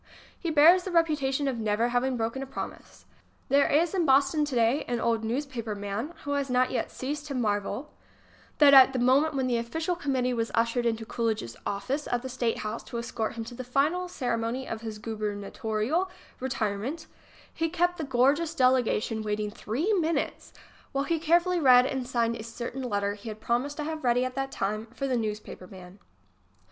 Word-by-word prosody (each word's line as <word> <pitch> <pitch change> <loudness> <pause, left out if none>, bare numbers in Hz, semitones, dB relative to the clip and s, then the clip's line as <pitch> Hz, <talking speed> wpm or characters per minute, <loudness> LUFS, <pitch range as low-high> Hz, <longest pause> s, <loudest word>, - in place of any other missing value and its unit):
He 340 - -2
bears 320 +4 +7
the 375 - -5
reputation 295 -5 +1
of 255 -4 -2
never 220 +2 +1
having 245 +1 0
broken 230 +3 -2
a 270 - -5
promise. - - -8 0.4
There 280 +1 +4
is 330 +5 +2
in 370 -3 +2
Boston 280 +1 +3
today 245 0 +1
an 240 -1 -1
old 230 -1 0
newspaper 235 -2 -3
man 205 +10 -4
who 285 - -4
has 280 -1 -1
not 255 0 +2
yet 255 - -1
ceased 290 +3 -5
to 280 - -4
marvel 215 +4 -2 0.6
that 290 -2 +7
at 265 -1 +9
the - - -1
moment 270 +5 +3
when 265 -1 0
the 245 -2 +1
official 320 +9 -2
committee 265 -6 0
was 230 -1 -1
ushered 235 +1 +1
into 225 -1 -1
Coolidge's 220 - -2
office 230 +9 -2
at 245 0 -1
the 260 - -5
State 240 -2 -1
House 215 +2 -4
to 235 - -6
escort 230 -1 -3
him 230 - -4
to 235 +2 -9
the 255 +1 -6
final 295 +9 +1
ceremony 245 -4 -2
of 225 -1 -5
his 220 -2 -6
gubernatorial 215 - -2 0.3
retire 225 -6 -1
ment, 285 +10 -5 0.5
he 330 0 -1
kept 355 +1 0
the - - -1
gorgeous 285 +5 +2
delegation 255 -5 +2
waiting 210 0 -2
three 280 - -1
minutes 330 -6 -1 0.4
while 275 0 +1
he 325 +3 0
carefully 345 +3 +3
read 250 -4 +7
and 260 -2 -3
signed 235 -2 0
a 220 - -7
certain 235 +3 -6
letter 205 -5 -1
he 210 +2 -9
had 215 0 -7
promised 250 +6 -1
to 300 - -2
have 315 +1 -4
ready 245 0 +3
at 255 - -4
that 270 0 -3
time 215 +3 -2
for 250 +4 -5
the 260 -2 0
newspaper 210 -4 -4
man. 185 +1 -13
255 Hz, 190 wpm, -28 LUFS, 225-290 Hz, 0.6 s, at